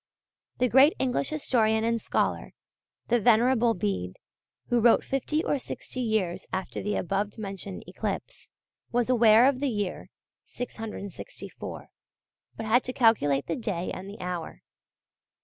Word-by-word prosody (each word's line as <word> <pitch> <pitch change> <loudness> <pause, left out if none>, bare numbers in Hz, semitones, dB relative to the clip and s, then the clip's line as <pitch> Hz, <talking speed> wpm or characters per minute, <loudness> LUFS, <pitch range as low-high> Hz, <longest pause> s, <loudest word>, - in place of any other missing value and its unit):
The 250 - +2
great 265 +6 +6
English 260 +1 0
historian 220 -7 +1
and 230 0 0
scholar, - - -1 0.6
the 240 +1 +4
Venerable 235 +1 +4
Bede, 90 - -2 0.5
who 240 - +3
wrote 235 0 +5
fifty 285 +4 -1
or 285 - 0
sixty 255 - -7
years 220 -7 -1
after 190 -1 -3
the 210 0 -1
above 200 +4 -2
mentioned 195 -2 -5
eclipse, - - -5 0.4
was 245 +1 +1
aware 230 -1 +6
of 270 -1 +3
the 280 0 0
year 205 -5 -3 0.4
(664), 220 -5 -7 0.7
but 225 - -4
had 235 +3 +3
to 255 - -4
calculate 145 - +3
the 165 - -2
day 185 -6 -3
and 190 +1 -7
the 205 - -10
hour. 180 -2 -5
225 Hz, 135 wpm, -27 LUFS, 195-245 Hz, 0.7 s, great